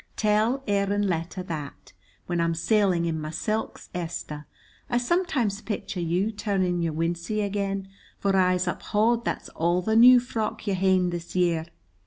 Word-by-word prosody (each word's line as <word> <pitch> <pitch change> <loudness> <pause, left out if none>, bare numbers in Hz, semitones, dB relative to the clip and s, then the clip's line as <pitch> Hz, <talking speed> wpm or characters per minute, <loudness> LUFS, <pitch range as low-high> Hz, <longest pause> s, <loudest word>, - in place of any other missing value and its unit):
Tell 220 +5 +1
Aaron 200 0 +1
Latta 175 +1 -2
that. 155 -5 -7 0.3
When 175 -1 -1
I'm 165 0 +1
sailing 185 -1 +2
in 160 -2 -2
my 155 - -4
silks, 215 +7 -3
Esther, 165 -3 -5 0.4
I 240 - +1
sometimes 245 - 0
picture 210 -4 -4
you 175 +5 0
turning 190 -5 0
your 165 -2 -1
wincey 170 +6 -1
again, 195 -1 -2 0.3
for 195 -1 +1
I'se 185 -1 +3
uphaud 220 +6 +1
that's - - -3
all 175 +2 0
the 220 +3 +1
new 245 +2 +9
frock 225 -4 -3
you've 200 -3 0
ha'en 185 -1 +3
the 175 -1 -4
year. 170 -3 +1
190 Hz, 155 wpm, -26 LUFS, 170-215 Hz, 0.4 s, new